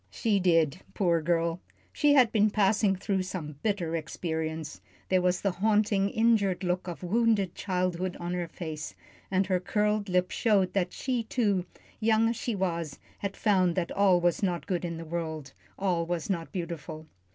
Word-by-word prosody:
She 215 -4 +1
did 165 -3 +2 0.2
poor 170 -4 +2
girl, 170 +1 0 0.3
she 295 -1 +4
had 250 -5 +5
been 215 -1 +4
passing 205 -1 +2
through 190 0 -1
some 160 -6 -6
bitter 185 -6 -1
experience. 160 -1 -4 0.3
There 185 -1 +3
was 180 0 +1
the 200 - +1
haunting, 205 +1 +2
injured 215 -5 +2
look 180 +1 -1
of 175 +1 -6
wounded 210 -1 +2
childhood 185 -1 -2
on 175 +1 -3
her 175 -1 -2
face, 155 - -6 0.3
and 190 0 +2
her 185 -1 +1
curled 210 +2 0
lip 180 0 +1
showed 200 -5 +2
that 180 -2 0
she, 255 -3 -2
too, 210 -5 0 0.3
young 225 0 +3
as 235 - -1
she 240 -2 -3
was, 170 -6 -2 0.2
had 200 -1 -4
found 185 -5 +2
that 175 -2 -1
all 195 -3 +4
was 175 -1 +1
not 180 -4 -1
good 180 -3 -2
in 170 -1 -4
the 165 - -7
world, 160 -4 -4 0.2
all 180 -4 0
was 170 +1 -2
not 170 -3 -3
beautiful. 165 -4 -5
185 Hz, 175 wpm, -28 LUFS, 170-205 Hz, 0.3 s, had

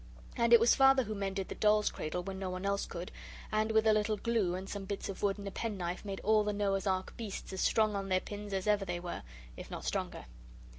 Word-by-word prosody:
And 235 0 +2
it 235 - +10
was 230 +1 +5
Father 270 -1 +6
who 215 -1 -4
mended 195 -1 -2
the - - -3
doll's 210 0 +3
cradle 180 +3 -3
when 190 +1 -5
no 190 -1 -3
one 185 +1 -4
else 200 0 0
could; 175 +1 -6 0.4
and 215 +1 +1
with 220 0 +3
a 220 - +6
little 215 0 +1
glue 210 -5 +1
and 190 +1 -5
some 200 -1 -5
bits 200 +1 -4
of 195 - -6
wood 200 -1 +1
and 200 -1 -7
a - - -4
pen 215 0 -3
knife 175 0 -3
made 195 -2 -4
all 215 0 +4
the 210 0 -1
Noah's 200 -1 0
Ark 185 -1 -1
beasts 215 -4 -6
as 190 - -2
strong 215 -2 +3
on 195 -1 -3
their 185 0 +3
pins 205 +1 -7
as 190 -1 -1
ever 210 -1 +3
they 175 -2 -3
were, 175 0 -5 0.3
if - - -9
not - - -6
stronger. - - -3
200 Hz, 255 wpm, -33 LUFS, 190-215 Hz, 0.4 s, it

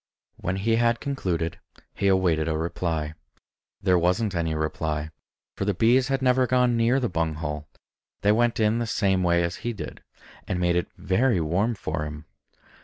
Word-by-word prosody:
When 90 - -2
he 115 +4 +1
had 120 0 +2
concluded, 90 - -2 0.3
he 100 - 0
awaited 90 -5 +2
a 80 -1 0
reply. 80 -2 -2 0.7
There 90 -1 +4
wasn't 90 +4 +1
any 80 -2 -1
reply; 80 0 -2 0.4
for - - -2
the 100 -1 0
bees 125 +6 +4
had 135 -1 -1
never 130 0 +3
gone 125 -1 +3
near 115 +3 +3
the 125 - 0
bung 80 -5 -1
hole; 75 -1 -4 0.5
they 100 - +4
went 120 +2 +2
in 110 +1 +2
the 120 - -2
same 95 -3 +1
way 85 -1 +3
as 85 +3 -2
he 120 - -3
did, 105 - -8 0.5
and 90 - -1
made 90 -1 +2
it 90 - 0
very 95 +4 +2
warm 95 +9 0
for 80 -5 -3
him. 75 0 -8
95 Hz, 180 wpm, -25 LUFS, 80-115 Hz, 0.7 s, There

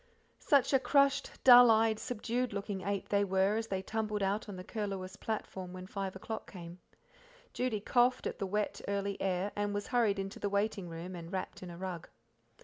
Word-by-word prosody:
Such 280 -1 +3
a 270 - +6
crushed, 275 +2 +3
dull 245 -1 +10
eyed, 220 -1 +4
subdued 245 +1 -2
looking 200 -1 -4
eight 200 +1 -3
they 200 0 +3
were 190 +1 +2
as 225 0 -2
they 190 -2 -2
tumbled 215 -1 -2
out 200 +2 -1
on 200 - -6
the 180 - -7
Curlewis 195 -3 -4
platform 190 -4 -5
when 185 0 -7
five 195 -1 -4
o'clock 220 +3 -6
came. 175 -1 -9 0.7
Judy 245 -5 -1
coughed 245 +3 +2
at - - -3
the 195 - -2
wet, 210 +2 -2
early, 200 0 -2
air, 190 +1 0
and 205 0 -1
was 205 - -3
hurried 230 -5 +2
into 195 +1 -5
the 205 - -1
waiting 200 -2 -1
room 170 +3 -7
and 170 0 -8
wrapped 190 - -4
in 185 - -7
a 170 - -9
rug. 180 -2 -6
200 Hz, 195 wpm, -32 LUFS, 190-220 Hz, 0.7 s, dull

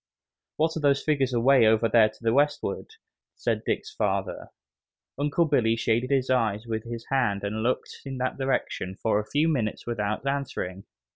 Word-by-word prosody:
"What 160 +1 +1
are - - -2
those 140 -2 +2
figures 140 -4 +1
away 125 0 +5
over 110 +1 +4
there 110 0 +5
to - - -19
the 115 0 +2
westward?" 145 - 0 0.4
said - - -1
Dick's 430 - -2
father. - - -2 0.7
Uncle 145 +4 +2
Billy 120 -7 +2
shaded 115 +2 0
his 135 -2 +1
eyes 110 -3 +1
with 110 -1 -4
his 115 -1 -6
hand 105 -7 +1
and 105 +2 -2
looked 120 +3 -2
in 135 -1 -6
that 130 +2 -2
direction 130 -8 -2
for 110 0 +1
a 105 - -5
few 150 +3 +2
minutes 120 -9 -1
without 105 0 -2
answering. 125 -9 -3
120 Hz, 170 wpm, -26 LUFS, 110-140 Hz, 0.7 s, away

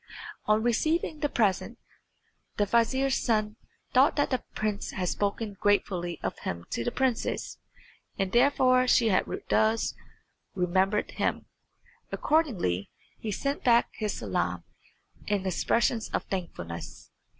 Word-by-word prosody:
On 215 +1 +3
receiving 310 +7 +1
the 290 - 0
present 210 -8 0 0.8
the 205 - +3
vizier's 260 +5 +2
son 215 -2 +1 0.4
thought 265 +3 +5
that 290 - +1
the 255 - 0
prince 210 -1 -2
had 180 -2 -2
spoken 205 +1 -2
gratefully 180 -4 +1
of - - -3
him 85 0 -5
to 115 - -1
the - - 0
princess, 260 -3 -1 0.6
and 195 -2 -1
therefore 255 0 +4
she 235 -2 +4
had 185 - +3 0.2
thus 220 +1 +2 0.6
remembered 190 +3 +1
him. - - -1 0.7
Accordingly 210 - 0 0.3
he 215 - -4
sent 275 +7 -2
back 235 -1 +4
his 210 -2 -3
salam - - -2 0.6
and 205 -2 0
expressions 225 +5 +1
of - - -1
thankfulness. 125 - -6
215 Hz, 125 wpm, -28 LUFS, 190-255 Hz, 0.8 s, thought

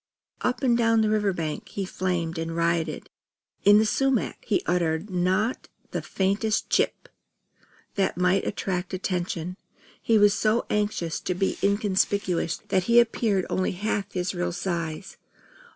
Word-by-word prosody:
Up 250 +2 -1
and 245 -3 +4
down 230 -1 +3
the 215 -1 +2
river 210 -2 +2
bank 160 -4 -4
he 195 - -3
flamed 175 -3 -2
and 165 0 -3
rioted. 170 -2 -1 0.5
In 205 +1 +7
the 215 - +4
sumac 270 +2 0
he 210 - +1
uttered 175 +2 0
not 185 +6 0 0.2
the - - -2
faintest 200 +3 -1
"Chip!" - - +1 0.9
that 195 -3 0
might 180 +2 +2
attract 180 -1 -2
attention. 180 -1 -3 0.4
He 225 - +3
was 205 -1 +5
so 220 +3 +1
anxious 205 -6 -1
to 180 - -3
be 190 +1 0
inconspicuous 200 -4 +1
that 185 -1 +1
he 235 0 +6
appeared 220 -5 +1
only 185 - -1
half 205 +1 -2
his 180 0 -1
real 175 -1 -2
size. 170 0 -4
190 Hz, 145 wpm, -26 LUFS, 175-210 Hz, 0.9 s, In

